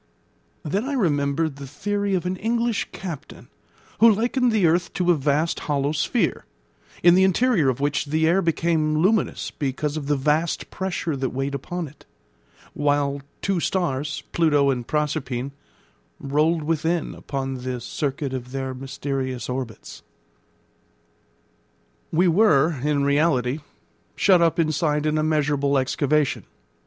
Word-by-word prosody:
Then 195 - -1
I 285 - -2
remembered 150 - 0
the 140 -1 -8
theory 200 +7 -1
of 180 - -2
an 180 +1 -1
English 230 +2 0
captain, 170 -7 -8 0.5
who 230 0 +8
likened 240 +3 +1
the 215 -5 +3
earth 170 +2 +2
to 180 -1 +2
a - - +4
vast 150 +3 0
hollow 140 0 +1
sphere, 165 +5 0 0.6
in 175 0 +7
the 190 +1 +5
interior 190 - +3
of 130 - -2
which 145 +2 0
the 160 +2 +1
air 180 +4 +3
became 160 -2 +1
luminous 195 +7 +1
because 145 +1 -2
of 145 -2 -5
the 145 - +2
vast 150 +4 0
pressure 175 -4 -2
that 130 -1 -1
weighed 135 +2 -3
upon 170 +5 -4
it; 145 - -18 0.7
while 145 -1 0 0.2
two 195 -3 +1
stars, 150 -5 -1
Pluto 145 -4 +3
and 125 -2 -3
Proserpine, 140 -4 -2 0.7
rolled 150 +4 +1
within 165 +2 -1
upon 135 -2 -4
the 125 0 -3
circuit 140 +2 -3
of 125 -1 -5
their 135 -1 -3
mysterious 130 -1 -4
orbits. 125 -3 -6 2.1
We 175 +3 +3
were 165 - +4
in 145 -1 +1
reality 140 -2 +2 0.6
shut 185 -3 +4
up 165 -1 +3
inside 155 -2 +1
an 155 0 +1
immeasurable 145 -2 +1
excavation. 145 +2 0
150 Hz, 135 wpm, -23 LUFS, 140-175 Hz, 2.1 s, who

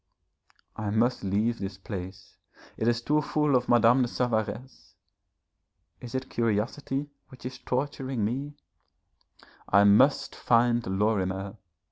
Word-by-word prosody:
I 105 -1 -3
must 115 +4 +1
leave 105 +5 0
this 95 -1 -5
place, 95 -1 -8 0.4
it 110 - -2
is 120 0 +1
too 150 +3 +2
full 150 -2 +1
of 125 -1 +1
Madame 120 +2 +5
de 125 - +2
Savaresse.... 120 +1 -3 1.0
Is 120 0 -8
it 130 - -3
curiosity 125 +6 -2 0.2
which 130 -3 -15
is 130 - -6
torturing 130 -3 -2
me? 140 +6 -3 1.1
I 100 +1 +5
must 105 +8 +4
find 120 0 +2
Lorimer. 95 0 -1
120 Hz, 120 wpm, -27 LUFS, 105-130 Hz, 1.1 s, Madame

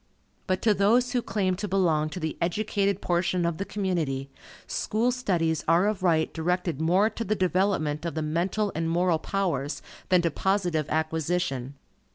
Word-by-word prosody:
But 185 0 0
to 220 - +5
those 230 +6 +3
who 245 -1 +1
claim 195 -4 0
to 205 +2 -3
belong 165 -5 +2
to 170 - -6
the 160 -2 -3
educated 200 +2 0
portion 175 0 +1
of 170 0 -1
the 195 - -2
community, 160 -11 -2 0.3
school 230 +4 0
studies 170 - 0
are 170 +4 +4
of 210 -3 -1
right 165 -3 +2
directed 170 -2 -1
more 180 +6 +4
to 230 - -4
the 215 0 0
development 185 -5 0
of 170 -1 -3
the 160 - -1
mental 180 +7 0
and 165 +1 -1
moral 170 -1 +2
powers, 155 -8 -2 0.3
than 180 -2 +4
to 170 - +1
positive 175 -4 0
acquisition. 155 -4 -1
180 Hz, 170 wpm, -27 LUFS, 160-195 Hz, 0.3 s, to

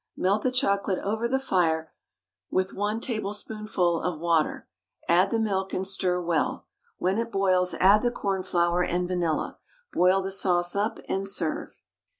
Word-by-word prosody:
Melt 200 +3 +1
the 255 - +1
chocolate 200 -6 +1
over 220 +4 -1
the 265 +2 +1
fire 165 -10 0 0.6
with 185 0 0
1 210 +3 -2
tablespoonful 210 -5 -1
of 170 -2 -2
water, 165 -2 0 0.4
add 180 +3 +4
the 230 - 0
milk, 195 -4 -1
and 190 0 -1
stir 185 -2 0
well; 170 -2 -1 0.3
when 190 +4 0
it 230 0 -3
boils 185 -2 +2
add 200 +3 +5
the 245 - +2
cornflour 180 -5 0
and 180 +1 -1
vanilla. 175 -4 -1 0.3
Boil 185 +2 +3
the 195 - -3
sauce 175 -2 +1
up, 205 +2 0
and 195 +1 -1
serve. 180 -5 -1
190 Hz, 155 wpm, -26 LUFS, 175-205 Hz, 0.6 s, add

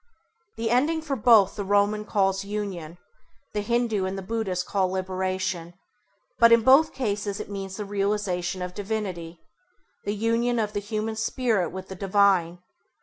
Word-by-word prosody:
The 225 0 -2
ending 295 +7 +2
for 290 -3 -2
both 215 -5 +5
the 205 - -3
Roman 205 +2 +1
calls 195 -2 +1
Union, 195 -5 -5 0.6
the 210 - -1
Hindû 225 -4 0
and 190 +1 -4
the 195 - -5
Buddhist 190 -4 -2
call 190 -2 0
Liberation, 185 -2 -3 0.6
but 230 0 +7
in 230 -1 +6
both 270 +6 +6
cases 205 -5 -2
it - - -7
means 195 -1 -5
the 210 - -4
realisation 195 -3 -1
of 180 0 -5
Divinity, 190 -5 -4 0.6
the 205 - -2
union 230 +3 +1
of 210 -2 -1
the - - -1
human 215 +1 -3
Spirit 225 - 0
with 190 0 -8
the 190 - -8
divine. 190 -3 +2
200 Hz, 155 wpm, -25 LUFS, 190-220 Hz, 0.6 s, but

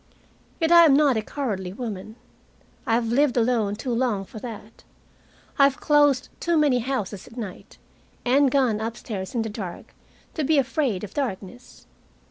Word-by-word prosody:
Yet 325 -1 +1
I 340 -1 +9
am 285 -4 +5
not 285 -3 +4
a 220 - 0
cowardly 205 -8 -4
woman. 215 -2 -6 0.7
I 225 - +3
have 230 -1 0
lived 265 +2 +2
alone 225 -4 +1
too 250 +4 -4
long 230 -5 0
for 220 - -10
that. 225 -1 -10 0.8
I 275 - +8
have 275 -1 0
closed 290 -3 +3
too 340 -1 +1
many 290 -5 +3
houses 225 -6 -4
at 240 - -15
night 210 -6 -8 0.5
and 270 +3 +4
gone 250 -6 +1
upstairs 220 -3 -5
in 230 - +1
the 225 - -4
dark 195 -5 -8 0.4
to 310 - -2
be 310 +2 +2
afraid 265 -7 0
of 210 - -7
darkness. 245 -3 -6
240 Hz, 165 wpm, -24 LUFS, 210-275 Hz, 0.8 s, I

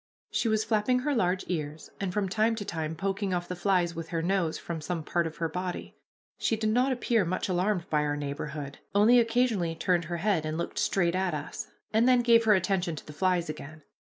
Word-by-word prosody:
She - - 0
was 215 -1 +2
flapping 230 +4 +1
her 290 +2 0
large 185 -6 +1
ears, 155 -3 -4
and 195 -2 -2
from 200 0 0
time 220 +4 +2
to 210 -2 -5
time 160 -2 -3
poking 195 +1 -1
off 175 0 -3
the 180 - -4
flies 180 -1 +1
with 165 -1 -6
her 165 -1 -2
nose 180 -3 +1
from 165 -2 -5
some 165 0 -3
part 170 +2 0
of 160 - -9
her 165 - 0
body. 180 +2 -5 0.4
She 225 - +1
did 215 0 0
not 250 +4 +3
appear 235 -4 +2
much 185 +1 -2
alarmed 185 0 0
by 150 -1 +3
our 145 0 -1
neighborhood, 145 0 -5 0.2
only 225 +4 +6
occasionally 225 -8 +1
turned 175 0 +1
her 170 +2 -3
head 190 -3 +1
and 155 0 -3
looked 170 - -3
straight 175 -3 +2
at 185 -3 0
us, 145 - -5 0.3
and 225 +3 +4
then 250 -1 +5
gave 230 -1 +5
her 215 -1 +6
attention 185 -2 0
to - - -9
the 150 - -10
flies 180 +1 +1
again. 155 0 -8
180 Hz, 220 wpm, -28 LUFS, 165-215 Hz, 0.4 s, only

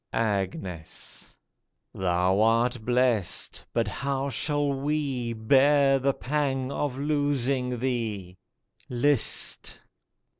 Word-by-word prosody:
54 115 -1 +1
AGNES 95 -4 -6 0.6
Thou 95 +1 +1
art 115 +1 +2
blest, 120 -6 +1
but 115 -2 0
how 140 +5 -2
shall 145 +1 0
we 135 -4 -2
Bear 135 +4 +4
the 140 +1 +2
pang 135 -2 -1
of 140 -2 -2
losing 140 -3 0
thee? 110 -7 -3 0.5
List 130 0 +1
125 Hz, 90 wpm, -26 LUFS, 110-140 Hz, 0.6 s, Bear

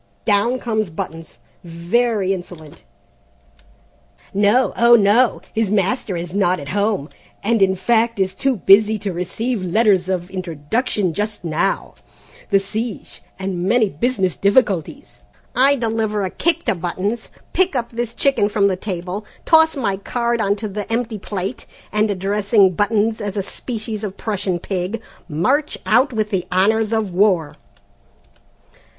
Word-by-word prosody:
Down 215 +4 +2
comes 220 -5 -1
Buttons, 165 0 -7 0.3
very 190 +4 0
insolent. 175 -5 -9 1.5
No, 205 +6 +3
oh, 235 0 +6
no, 220 +3 +3
his 220 -2 0
master, 200 -1 0
'is 170 0 -6
not 185 -3 +2
at 140 -1 -8
home, 200 -5 0 0.4
and 225 +1 +1
in 190 -1 +4
fact 230 +3 +1
is 190 -1 +1
too 265 +7 0
busy 215 +2 +5
to 200 -2 -4
receive 205 +6 -3
letters 190 0 +2
of 180 -1 -2
introduction 185 - -2
just 210 +2 -3
now; 165 +4 -1 0.6
the 200 - +4
siege, 215 +2 -5 0.2
and 190 -2 -3
many 220 +1 +3
business 190 - 0
difficulties 200 - 0 0.2
' - - -36
"I 285 - +4
deliver 220 -4 -1
a 185 - -2
kick 340 0 0
to - - +2
Buttons, 190 +6 -3 0.2
pick 370 -4 +2
up 235 -2 -2
this 235 0 -4
chicken 270 -7 +2
from 200 -2 +2
the 190 - 0
table, 185 +1 -5 0.2
toss 320 -1 +5
my 200 -7 -1
card 235 +3 -1
on 200 -1 +2
to 215 +1 -5
the 205 +2 -6
empty 225 -2 -1
plate, 195 +4 -5 0.2
and 210 +1 +1
addressing 200 0 +2
Buttons 220 +3 +1
as 205 -1 -4
a 200 - 0
species 220 0 -5
of 200 -2 -5
Prussian 200 -4 -2
pig, 185 +4 -3 0.3
march 260 - 0
out 245 +9 +3
with 215 -3 -1
the 180 -3 -1
honours 215 +4 +2
of 220 -5 -1
war." 180 -5 +2
205 Hz, 145 wpm, -20 LUFS, 185-230 Hz, 1.5 s, oh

